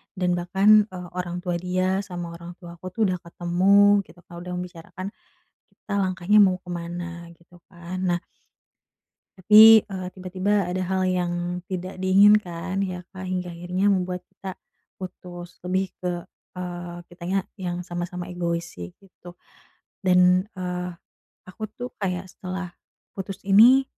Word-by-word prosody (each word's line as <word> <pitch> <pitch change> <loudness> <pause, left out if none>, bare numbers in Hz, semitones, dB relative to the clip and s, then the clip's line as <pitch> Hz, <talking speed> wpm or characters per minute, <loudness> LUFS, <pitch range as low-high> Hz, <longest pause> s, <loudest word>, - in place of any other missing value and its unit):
Dan 180 -2 +1
bahkan, 200 +4 +5
eee, 180 -3 -8
orang 180 0 -4
tua 180 -1 -1
dia 185 +2 0
sama 175 -3 -6
orang 170 +1 -10
tuaku 170 0 -12
tuh - - -2
udah 180 - -2
ketemu 190 +4 +4
gitu, 170 +3 -17
Kak, 170 - -13
udah 180 +1 -7
membicarakan 180 +1 -7 0.6
kita 205 - -8
langkahnya 185 +2 +3
mau 185 -2 +2
ke 180 - -29
mana 170 0 -6
gitu 170 +1 -20
kan, 175 +1 -7
nah 175 -1 +1 1.2
tapi, 215 +4 +9
eee, 190 -3 -6
tiba-tiba 190 +1 -1
ada 185 +1 -1
hal 185 0 0
yang 180 -1 0 0.3
tidak 185 0 -5
diinginkan 190 -1 +3
ya, 180 -2 -4 0.2
Kak, 185 - -6
hingga 180 -1 -2
akhirnya 180 +3 -1
membuat 180 -2 0
kita 190 -1 -8 0.5
putus. 175 -1 -9
Lebih 185 +1 0
ke, 180 - -3 0.4
eee, 175 -1 -6
kitanya 175 +2 -2 0.2
yang 180 -2 -3
sama-sama 175 0 -5
egois 170 -1 -1 0.2
sih 90 0 -7
gitu. 180 -2 -14 0.7
Dan, 180 0 +4
eee, 180 0 -3 0.5
aku 215 +4 -7
tuh 245 +3 -7
kayak 185 -2 -1
setelah 185 -1 -6 0.4
putus 195 0 -7
ini, 230 +7 +7
180 Hz, 140 wpm, -25 LUFS, 175-190 Hz, 1.2 s, tapi